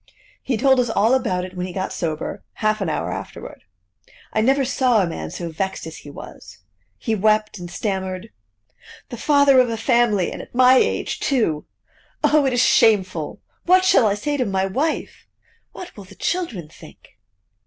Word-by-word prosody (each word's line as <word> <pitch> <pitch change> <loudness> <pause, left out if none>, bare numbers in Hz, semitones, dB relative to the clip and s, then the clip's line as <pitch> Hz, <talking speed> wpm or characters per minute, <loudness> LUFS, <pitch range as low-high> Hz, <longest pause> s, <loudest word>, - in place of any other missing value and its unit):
He 255 -4 -2
told 265 +2 +4
us 245 -2 +1
all 225 +2 +2
about 185 -8 0
it 185 0 -11
when 180 0 -3
he 180 - -8
got 190 0 -3
sober, 155 -3 -4
half 215 -1 -1
an 190 - -1
hour 155 - -2
afterward. - - -8 0.7
I 215 - +2
never 270 +4 +2
saw 250 -5 +2
a - - -1
man 80 - -5
so 170 - -6
vexed 190 +3 -3
as 160 -1 -8
he 145 - -12
was. 145 - -11 0.4
He 225 - -2
wept, 215 0 +1
and 175 -1 -7
stammered: 190 -1 -4 0.8
"The 240 - -7
father 280 0 +4
of 250 -1 +3
a 225 - -3
family, 225 -5 +2
and - - -6
at - - -14
my 255 +1 +6
age - - 0
too! 220 - 0 0.6
Oh! 295 -2 +4
it 260 - 0
is 245 0 +3
shameful! 185 -11 +2 0.3
What 370 +1 +5
shall 240 -11 +5
I 200 - +1
say 290 +8 -2
to 255 - 0
my 190 -1 0
wife? 280 +12 -3 0.4
What 360 - -10
will 200 - -11
the 195 +1 -15
children 235 - -3
think?" 155 -8 -17
215 Hz, 185 wpm, -21 LUFS, 185-255 Hz, 0.8 s, my